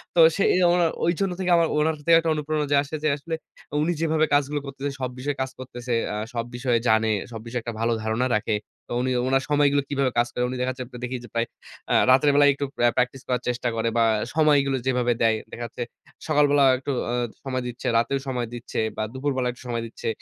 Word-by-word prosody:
তো - - +3 0.2
সেজন্য 180 -2 +3 0.2
ঐজন্য 180 +3 +1
থেকে 185 -1 0
আমার 165 -1 +3
ওনার 155 +1 +2 0.2
একটা 165 0 -1
অনুপ্রেরণা 150 0 -1 0.2
আসে 145 +2 -6
যে, - - +2
আসলে 165 +3 -7 0.5
উনি 160 +3 +1
যেভাবে 160 -1 +2
কাজগুলো 145 +1 +2
করতেছে, 140 +1 -4
সব 130 - -1
বিষয়ে 140 +2 -2
কাজ 130 0 -2
করতেছে, 125 -1 -7 0.2
আ - - -3 0.2
সব 115 -1 -2
বিষয়ে 120 -1 +1
জানে, 110 0 +3 0.2
সব 115 - -6
বিষয়ে 120 +1 -3
একটা 115 - -4
ভালো 115 +1 +1
ধারণা 110 +3 0
রাখে। 105 +1 0 0.3
তো - - -4
উনি 130 +1 0 0.2
উনার 135 0 +2
সময়গুলো 145 -1 +3
কিভাবে 140 -2 +1
কাজ 120 0 +3
করে? 125 - -1
উনি 130 - -4
দেখা 130 +1 0
যাচ্ছে - - -2 0.2
দেখি 125 +1 -3
যে, - - -10
প্রায় 115 0 0 0.4
আ - - +3 0.2
রাতের 135 +3 +5
বেলায় 145 0 +6
একটু 140 +1 -3
প্র্যা 120 0 +3
প্র্যাকটিস 125 +1 0
করার 125 -1 0
চেষ্টা 125 0 -1
করে 115 0 0
বা, 115 - +5 0.2
আ - - -2
সময়গুলো 145 -4 +3
যেভাবে 125 -2 +2
দেয়। 115 -1 +4
দেখা 120 - -5
যাচ্ছে 120 - -5 0.4
সকালবেলা 145 -2 +4
একটু 130 +2 -4 0.2
আ - - -1 0.3
সময় 130 -2 -2
দিচ্ছে, 120 0 -6
রাতেও 125 +4 +1
সময় 125 -3 -2
দিচ্ছে 120 0 -5 0.2
বা, - - -1
দুপুরবেলা 130 -1 -1
একটু 125 - -15
সময় 115 -1 -2
দিচ্ছে। 115 - -8
130 Hz, 210 wpm, -24 LUFS, 120-145 Hz, 0.5 s, বেলায়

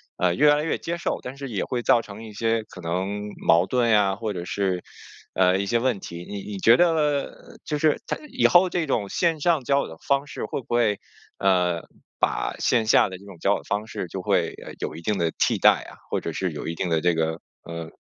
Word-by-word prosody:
呃， 90 -1 +2
越 145 +1 +5
来 150 - -1
越 165 - -1
接 170 +1 -4
受， - - -2
但 125 +2 -7
是 140 -2 -6
也 100 -4 -2
会 125 -2 -2
造 115 - +4
成 105 +1 -10
一 110 - -9
些 115 +1 0
可 95 - -14
能 95 +5 -3 0.2
矛 85 +2 +5
盾 120 +1 +1
呀， 100 -3 +4
或 110 0 -3
者 90 -2 -5
是， 95 -2 -1 0.5
呃， 95 0 +3
一 100 - -1
些 115 +3 +1
问 120 -5 0
题。 85 -1 -8
你 100 -1 -6
你 105 -2 -6
觉 115 +5 +6
得， 175 -2 +4
呃， 150 -3 -2
就 150 - -1
是 155 0 +2
它 - - -1
以 - - +3
后 180 +1 +5
这 170 -3 -1
种 105 -7 -1
线 165 -4 0
上 160 -7 +2
交 140 0 +3
友 - - -4
的 80 - -10
方 140 +1 +2
式 - - -5
会 - - -4
不 - - -26
会， 110 -4 +3 0.4
呃， 90 -3 +2 0.4
把 - - 0
线 115 -2 +2
下 105 - +5
的 95 - -7
这 100 - -16
种 95 -4 -11
交 100 +4 +2
往 - - -6
方 105 +1 -2
式 90 - -5
就 95 +3 -5
会， - - +1
呃， - - -8
有 - - -4
一 85 - -8
定 105 +3 -1
的 85 -1 0
替 - - +2
代 - - +5
啊， - - -14
或 - - -1
者 - - -4
是 - - -2
有 - - -6
一 85 - -3
定 90 0 -2
的 80 -1 +1
这 90 -1 +3
个， 80 0 -1 0.4
呃 80 -1 -5
105 Hz, 265 characters per minute, -24 LUFS, 90-130 Hz, 0.5 s, 觉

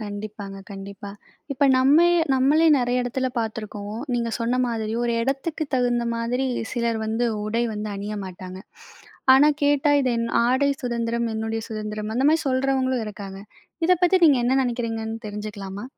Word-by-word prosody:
கண்டிப்பாங்க, 205 -1 -7
கண்டிப்பா. 200 0 -8 0.4
இப்ப 280 +1 +1
நம்மே 295 +7 +5 0.3
நம்மளே 285 +5 +4
நெறைய 250 0 0
இடத்துல 260 +2 -1
பார்த்துருக்கோம். 215 -2 -5 0.2
நீங்க 235 -1 -1
சொன்ன 240 +2 0
மாதிரி 220 -2 -3
ஒரு 240 -1 0
எடத்துக்கு 275 +5 -2
தகுந்த 245 -2 +1
மாதிரி 245 +3 -1 0.3
சிலர் 235 -2 -1
வந்து 225 +2 0 0.2
உடை 225 +3 0
வந்து 210 0 -4
அணிய 205 +2 -5
மாட்டாங்க. 185 0 -8 0.8
ஆனா 285 +3 +6
கேட்டா 290 0 +3
இது 260 -2 +1
"என் 230 0 -1 0.2
ஆடை 260 +3 +2
சுதந்திரம், 235 -1 -1
என்னுடைய 225 0 -3
சுதந்திரம்." 215 -1 -5
அந்த 255 +3 +1
மாரி 320 +1 +3
சொல்கிறவங்களும் 260 -2 0
இருக்காங்க. 195 -2 -8 0.5
இத 365 - +5
பத்தி 360 +1 +5
நீங்க 285 -4 +5
என்ன 245 - +2
நினைக்கிறீங்கன்னு 225 -2 -3
தெரிஞ்சுக்கலாமா? 205 -1 -6
235 Hz, 145 wpm, -23 LUFS, 215-260 Hz, 0.8 s, ஆனா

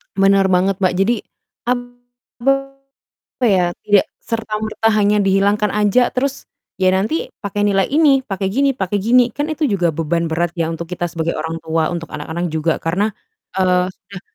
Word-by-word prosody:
Bener 195 0 +4
banget, 190 +2 +2
Mbak. 185 -2 +2
Jadi 200 +5 +3 0.6
apa 245 +1 -3 1.0
ya, 175 -2 +2
tidak 205 -2 +4
serta-merta 220 0 -2
hanya 210 0 +3
dihilangkan 200 +2 +2
aja 210 +4 +2
terus, 275 +2 -2 0.3
ya 185 0 +3
nanti 315 - -1
pakai 205 0 -2
nilai 195 -2 +2
ini, 285 -2 +4
pakai 195 -3 -3
gini 275 +4 +2
pakai 195 0 -1
gini, 240 +5 +5
kan 290 +5 -2
itu 315 0 -1
juga 195 -10 +1
beban 165 +2 -1
berat 165 +1 -1
ya 165 -1 0
untuk 165 +1 -5
kita 175 -1 -2
sebagai 165 0 -2
orang 160 0 -3
tua 160 0 0
untuk 170 -1 -6
anak-anak 160 +4 -4
juga 160 0 0
karena, 180 +6 0 0.5
eee, 180 -1 +2
sudah 200 -3 -12
195 Hz, 160 wpm, -18 LUFS, 175-230 Hz, 1.0 s, gini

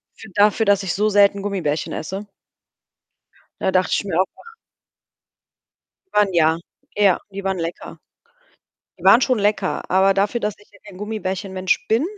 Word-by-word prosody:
für 220 - -12
dafür, 210 +2 +3
dass 200 -1 +3
ich 180 - -2
so 210 +2 +1
selten 200 -1 +4
Gummibärchen 175 -7 -2
esse. 195 +6 -5 1.3
Da 190 - 0
dachte 185 0 +2
ich - - +1
mir 190 -5 -3
auch 190 - +4
noch 460 - -15 1.6
Waren 205 -3 +2
ja. 160 -1 +3 0.4
Ja, 200 -3 +3
die 200 0 -7
waren 190 -1 -1
lecker. 165 +1 -6 1.0
Die - - -14
waren - - +7
schon 255 -2 +1
lecker, 205 -2 -1
aber 190 +1 +4
dafür, 205 +4 0
dass 210 -1 -2
ich 205 - -22
ja 200 - -20
gar - - -17
kein 185 - -13
Gummibärchen 200 -2 -4
Mensch 185 0 -1
bin 225 +6 +2
200 Hz, 170 wpm, -21 LUFS, 185-210 Hz, 1.6 s, waren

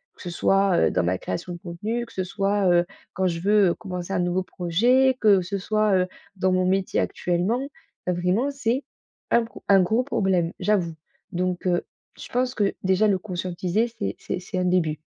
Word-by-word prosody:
Que - - -16
ce 175 - -5
soit, 195 +1 +2
heu, - - +4
dans 90 - +1
ma 90 +2 +1
création 95 - -4
de 175 - -8
contenu, 210 +8 -4
que - - -17
ce 185 - -1
soit, 195 +1 0
heu, 175 0 +4 0.3
quand 190 0 +1
je 170 -2 -2
veux, 205 +1 +4
heu, - - +1
commencer 180 -2 -5
un 190 - +1
nouveau 175 +1 +1
projet, 240 +11 +2
que 205 -3 +5
ce 200 +3 -3
soit, 215 +1 +1
heu, 185 0 +2 0.3
dans 185 0 +2
mon 185 0 +2
métier 190 +1 +1
actuellement. 180 +8 0 0.5
Vraiment, 180 +9 +1
c'est 270 -1 -1 0.5
un 235 -1 +4
pro 225 - -13
un 195 -1 +6
gros 220 +7 +2
problème, 190 -9 0
j'avoue. 185 -6 +1 0.4
Donc, 180 0 -2
heu, 175 -1 +1 0.3
je - - -9
pense 255 +1 0
que 200 -2 +1
déjà 190 +3 +3
le 195 -2 +2
conscientiser, 185 +2 -1
c'est 100 0 -2
c'est 185 - -4
c'est 185 0 -6
un 180 - +1
début. 175 -4 +1
185 Hz, 200 wpm, -24 LUFS, 175-210 Hz, 0.5 s, un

